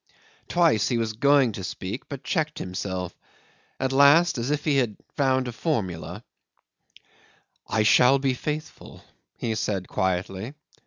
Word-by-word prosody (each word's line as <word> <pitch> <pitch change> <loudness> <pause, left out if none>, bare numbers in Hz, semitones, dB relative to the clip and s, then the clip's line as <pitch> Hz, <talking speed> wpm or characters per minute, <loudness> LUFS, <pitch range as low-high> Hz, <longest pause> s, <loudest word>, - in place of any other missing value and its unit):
Twice 165 - +3
he 120 - 0
was 115 -1 -1
going 140 +1 +4
to 100 -2 -7
speak, 95 +6 -6
but 140 -2 -7
checked 155 -1 -1
himself; 90 -1 -4 0.6
at 130 0 0
last, 140 +3 +5
as 120 +3 -2
if 150 0 -1
he 145 -3 +2
had 120 -6 0 0.2
found 130 -2 +1
a - - -3
formula 110 - -3 1.4
'"I 110 - +1
shall 125 +5 +5
be 135 -1 0
faithful," 150 +4 -6 0.3
he 115 - -2
said 100 -3 -2
quietly. 95 +7 -2
125 Hz, 140 wpm, -25 LUFS, 100-140 Hz, 1.4 s, last